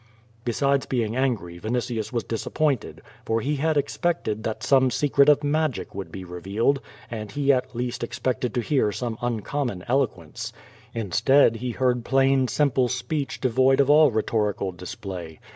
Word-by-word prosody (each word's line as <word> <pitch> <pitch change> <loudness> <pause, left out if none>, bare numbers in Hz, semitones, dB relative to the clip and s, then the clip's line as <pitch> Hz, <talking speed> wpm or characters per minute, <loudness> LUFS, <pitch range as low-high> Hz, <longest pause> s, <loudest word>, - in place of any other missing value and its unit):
Besides 140 +3 +1
being 115 -3 -1
angry, 110 -10 -1
Yinitius 115 0 -2
was 120 -2 -1
disappointed, 135 +3 -2 0.2
for 115 0 0
he 145 +5 -1
had 155 +2 +1
expected 145 -6 -1
that 110 -1 -3
some 130 -1 +4
secret 140 +1 +3
of 145 0 +4
magic 150 -2 -1
would 100 0 -6
be 95 - -7
revealed, 100 +10 -1 0.3
and 110 -2 -5
he 140 +2 +3
at 130 -1 -2
least 120 0 -3
ex 120 - -5
pected 130 -1 -1
to 120 - 0
hear 120 -3 +1
some 115 +2 -3
uncommon 120 -3 -2
eloquence. 120 - -1 0.4
Instead 115 +4 +3
he 125 +2 -4
heard 125 0 0
plain, 135 0 +3
simple 130 -2 +2
speech 130 +4 -3
devoid 130 +2 +3
of 140 0 +5
all 150 0 +7
rhetorical 105 -3 0
display. 90 -4 -7
125 Hz, 155 wpm, -25 LUFS, 110-140 Hz, 0.4 s, all